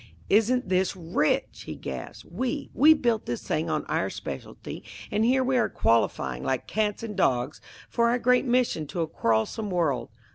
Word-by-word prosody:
"Isn't 230 Hz, +4 st, +3 dB
this 185 Hz, +1 st, +1 dB
rich!" 165 Hz, -4 st, -1 dB
he -, -, -5 dB
gasped. -, -, -7 dB
"We 260 Hz, -, -3 dB
we 310 Hz, +3 st, +7 dB
built 235 Hz, -6 st, 0 dB
this 120 Hz, -, -3 dB
thing 160 Hz, +2 st, -1 dB
on 155 Hz, -1 st, -1 dB
our -, -, 0 dB
specialty, 70 Hz, -, -7 dB, 0.3 s
and 210 Hz, +1 st, +1 dB
here 260 Hz, +3 st, +3 dB
we 260 Hz, 0 st, +1 dB
are -, -, +2 dB
qualifying 110 Hz, -, +1 dB
like 130 Hz, -2 st, -1 dB
cats 210 Hz, 0 st, -1 dB
and 215 Hz, -2 st, -5 dB
dogs 130 Hz, -6 st, +1 dB, 0.3 s
for 235 Hz, -1 st, +2 dB
our 240 Hz, -, +2 dB
great 250 Hz, +2 st, +3 dB
mission 240 Hz, -, +1 dB
to 170 Hz, -, -3 dB
a 165 Hz, -, 0 dB
quarrelsome 115 Hz, -, 0 dB
world. 145 Hz, -10 st, 0 dB
195 Hz, 175 wpm, -26 LUFS, 150-240 Hz, 0.3 s, we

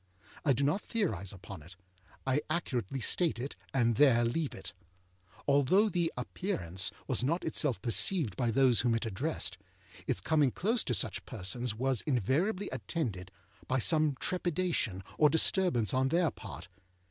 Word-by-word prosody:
I 140 Hz, -, +4 dB
do 135 Hz, +3 st, -1 dB
not 150 Hz, +9 st, +1 dB
theorise 105 Hz, -, -2 dB
upon 95 Hz, -2 st, -10 dB
it; 85 Hz, +4 st, -14 dB, 0.5 s
I 135 Hz, +2 st, +1 dB
accurately 135 Hz, -, -2 dB
state 165 Hz, +4 st, +2 dB
it, 130 Hz, +4 st, -5 dB, 0.2 s
and 120 Hz, -4 st, +2 dB
there 120 Hz, -5 st, +5 dB
leave 145 Hz, +5 st, -2 dB
it. 95 Hz, -1 st, -8 dB, 0.7 s
Although 145 Hz, +10 st, +4 dB
the 170 Hz, -3 st, 0 dB
Appearance 95 Hz, -, 0 dB, 0.2 s
was -, -, 0 dB
not 165 Hz, +7 st, 0 dB
itself 145 Hz, -, -1 dB
perceived 125 Hz, -, +2 dB
by 120 Hz, -3 st, 0 dB
those 125 Hz, -1 st, +4 dB
whom 120 Hz, -2 st, +2 dB
it 115 Hz, -, -2 dB
addressed, 110 Hz, -, -1 dB, 0.5 s
its -, -, 0 dB
coming 150 Hz, -4 st, +2 dB
close 220 Hz, -, 0 dB
to 125 Hz, -, 0 dB
such -, -, -1 dB
persons 110 Hz, +5 st, -2 dB
was 130 Hz, +1 st, 0 dB
invariably 160 Hz, -, 0 dB
attended 100 Hz, -, -3 dB, 0.4 s
by 130 Hz, -, +1 dB
some 155 Hz, +2 st, +2 dB
trepidation 175 Hz, -, -1 dB, 0.2 s
or 150 Hz, -, +6 dB
disturbance 160 Hz, -, +2 dB
on 130 Hz, +1 st, +2 dB
their 165 Hz, +1 st, +2 dB
part. 90 Hz, -5 st, -9 dB
135 Hz, 150 wpm, -31 LUFS, 115-165 Hz, 0.7 s, or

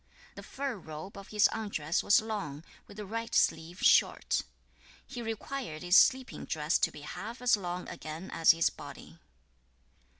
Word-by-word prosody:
5. -, -, -30 dB
The -, -, -7 dB
fur 270 Hz, -4 st, -4 dB
robe 160 Hz, +2 st, -9 dB
of 200 Hz, -1 st, -10 dB
his 210 Hz, -1 st, +4 dB
undress 180 Hz, -8 st, -2 dB
was 205 Hz, -, +5 dB
long, 165 Hz, -10 st, -5 dB, 0.2 s
with 200 Hz, -, -13 dB
the 210 Hz, -, -6 dB
right 230 Hz, +3 st, -4 dB
sleeve 165 Hz, +3 st, +1 dB
short. -, -, +4 dB
6. -, -, -3 dB, 0.6 s
He 250 Hz, -3 st, -7 dB
required 225 Hz, -, -5 dB
his 180 Hz, +1 st, +3 dB
sleeping 260 Hz, +3 st, +4 dB
dress 155 Hz, 0 st, 0 dB
to -, -, +3 dB
be 150 Hz, -, -11 dB
half 220 Hz, -, -7 dB
as 250 Hz, -1 st, +4 dB
long 180 Hz, -2 st, -5 dB
again 165 Hz, +1 st, -7 dB
as 165 Hz, -, +2 dB
his 165 Hz, 0 st, +5 dB
body. -, -, -11 dB
195 Hz, 170 wpm, -30 LUFS, 160-225 Hz, 0.6 s, was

